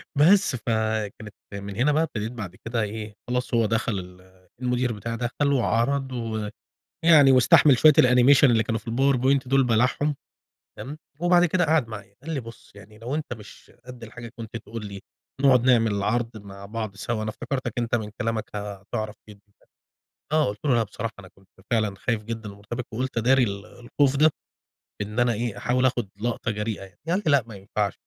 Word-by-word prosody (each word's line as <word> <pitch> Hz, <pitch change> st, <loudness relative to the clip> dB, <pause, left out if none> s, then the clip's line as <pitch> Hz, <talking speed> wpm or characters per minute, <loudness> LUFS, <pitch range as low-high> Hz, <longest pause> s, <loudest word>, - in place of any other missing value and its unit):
بس 170 Hz, +1 st, +5 dB
فكانت 110 Hz, -2 st, -2 dB, 0.2 s
من 100 Hz, 0 st, -6 dB
هنا 130 Hz, +7 st, +2 dB
بقى 155 Hz, +2 st, +2 dB
ابتديت 110 Hz, -7 st, -4 dB
بعد 100 Hz, -7 st, -7 dB
كده 115 Hz, -1 st, -1 dB
إيه 105 Hz, 0 st, -5 dB
خلاص 125 Hz, 0 st, -2 dB
هو 115 Hz, -1 st, +3 dB
دخل 110 Hz, -2 st, 0 dB
ال 90 Hz, 0 st, -14 dB
المدير 125 Hz, 0 st, 0 dB
بتاعي 115 Hz, +3 st, -5 dB
دخل 140 Hz, +4 st, 0 dB
وعرض 130 Hz, +2 st, +1 dB
و 110 Hz, -4 st, -3 dB, 0.6 s
يعني 150 Hz, -5 st, +7 dB
واستحمل 130 Hz, +1 st, +6 dB
شوية 155 Hz, -, +7 dB
الanimation 125 Hz, +1 st, +6 dB
اللي 115 Hz, -5 st, +5 dB
كانوا 110 Hz, +1 st, -2 dB
في 115 Hz, -, -9 dB
الpowerpoint 135 Hz, +1 st, +2 dB
دول 135 Hz, +1 st, +4 dB
بلعهم 125 Hz, +5 st, +1 dB, 0.6 s
تمام؟ 145 Hz, +3 st, -7 dB, 0.2 s
وبعد 175 Hz, 0 st, +5 dB
كده 180 Hz, +1 st, +2 dB
قعد 155 Hz, -6 st, +2 dB
معايا، 100 Hz, -3 st, -9 dB
قال 160 Hz, +2 st, -4 dB
لي 135 Hz, -, -1 dB
بُصّ 115 Hz, -1 st, -13 dB
يعني 105 Hz, +1 st, -15 dB
لو 120 Hz, +5 st, -4 dB
أنت 150 Hz, -4 st, -4 dB
مش 105 Hz, -3 st, -11 dB
قدّ 125 Hz, -2 st, -10 dB
الحاجة 115 Hz, +1 st, -9 dB
كنت 115 Hz, 0 st, -7 dB
تقول 110 Hz, 0 st, -7 dB
لي 100 Hz, -1 st, -8 dB, 0.4 s
نقعد 130 Hz, -3 st, +5 dB
نعمل 115 Hz, -4 st, +4 dB
العرض 110 Hz, +4 st, 0 dB
مع 100 Hz, -1 st, -10 dB
بعض 110 Hz, -2 st, -5 dB
سوا، 110 Hz, +1 st, -3 dB
أنا 110 Hz, -, -2 dB
افتكرتك 130 Hz, +4 st, -4 dB
أنت 120 Hz, 0 st, -1 dB
من 110 Hz, -3 st, -1 dB
كلامك 115 Hz, -2 st, -1 dB
هتعرف 105 Hz, +1 st, -5 dB
في 105 Hz, -1 st, -13 dB, 0.9 s
آه 155 Hz, 0 st, +3 dB
قلت 105 Hz, +1 st, -6 dB
له: 130 Hz, -, +3 dB
"لأ 115 Hz, -, +3 dB
بصراحة 110 Hz, +1 st, -5 dB
أنا 95 Hz, -, -11 dB
كنت 95 Hz, +1 st, -24 dB, 0.2 s
فعلًا 110 Hz, -4 st, +1 dB
خايف 110 Hz, +2 st, -2 dB
جدًا 110 Hz, -1 st, -6 dB
ومرتبك 110 Hz, +5 st, -7 dB
وقولت 130 Hz, +1 st, -3 dB
أداري 125 Hz, +3 st, +4 dB
ال 100 Hz, -2 st, -3 dB
الخوف 130 Hz, +3 st, 0 dB
ده 155 Hz, +3 st, +5 dB, 0.7 s
إن 105 Hz, +3 st, -3 dB
أنا 120 Hz, -1 st, +3 dB
إيه 115 Hz, 0 st, -3 dB
أحاول 125 Hz, +1 st, +1 dB
آخد 120 Hz, -5 st, 0 dB
لقطة 115 Hz, 0 st, -1 dB
جريئة 105 Hz, +1 st, -3 dB
يعني،" 95 Hz, -2 st, -15 dB
فقال 180 Hz, +5 st, +1 dB
لي: 155 Hz, -, +3 dB
"لأ 140 Hz, -5 st, +4 dB
ما 110 Hz, -, -9 dB
ينفعش 100 Hz, 0 st, -2 dB
115 Hz, 185 wpm, -25 LUFS, 105-130 Hz, 0.9 s, يعني